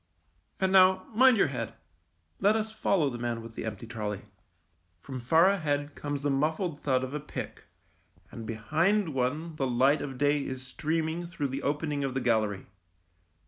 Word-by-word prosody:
And 190 0 +1
now 185 0 +6
mind 255 +1 +6
your 185 - +3
head; 115 -3 -4 0.6
let 205 +2 +4
us 220 0 -2
follow 180 -9 +1
the 120 - -6
man 120 -1 -3
with 115 0 -10
the - - -5
empty 110 0 -5
trolley. 105 -3 -4 0.8
From 130 +4 -7
far 160 +9 +5
ahead 145 -6 -1
comes 145 -1 -4
the 145 - +1
muffled 155 +3 -1
thud 130 -2 +1
of 130 +1 -5
a 150 - -2
pick, 150 - -7 0.7
and 115 -1 -8
behind 160 - +1
one 150 +6 -2
the 135 - 0
light 130 +4 +3
of 135 -2 -5
day 145 +1 +2
is 130 -1 -5
streaming 160 +5 -2
through 150 -5 -3
the 135 - -4
opening 145 0 -1
of 135 -1 -2
the - - +1
gallery. 110 -5 0
145 Hz, 175 wpm, -29 LUFS, 125-165 Hz, 0.8 s, now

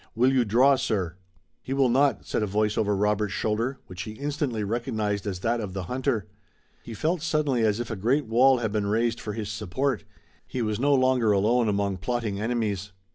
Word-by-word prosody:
Will 125 +4 +3
you 130 -2 +4
draw, 130 +6 +4
sir?" 95 -9 -1 0.5
"He 135 - -4
will 135 -1 +3
not," 135 +3 +2
said - - -1
a 105 - 0
voice 105 +1 0
over 105 -2 +1
Robert's 105 0 0
shoulder, 115 +5 -1
which 90 -1 -8
he 105 +3 -6
instantly 140 -3 -2
recognized 105 -2 -2
as 95 -3 -4
that 120 +2 0
of 100 -3 -5
the 95 -1 -3
hunter. 125 -1 -1 0.6
He 115 - -8
felt 160 - 0
suddenly 155 -6 +1
as 105 0 +2
if 120 0 -4
a - - -2
great 125 +9 +1
wall 125 +4 +4
had 115 -3 -2
been 105 -1 -1
raised 115 +2 0
for 105 - -4
his 105 -1 -4
support. 110 +5 -2 0.4
He 125 - -3
was 110 -1 -1
no 140 +2 +3
longer 130 -4 +3
alone 110 +4 +2
among 100 -1 0
plotting 110 0 -2
enemies. 105 -4 -2
110 Hz, 200 wpm, -26 LUFS, 105-130 Hz, 0.6 s, you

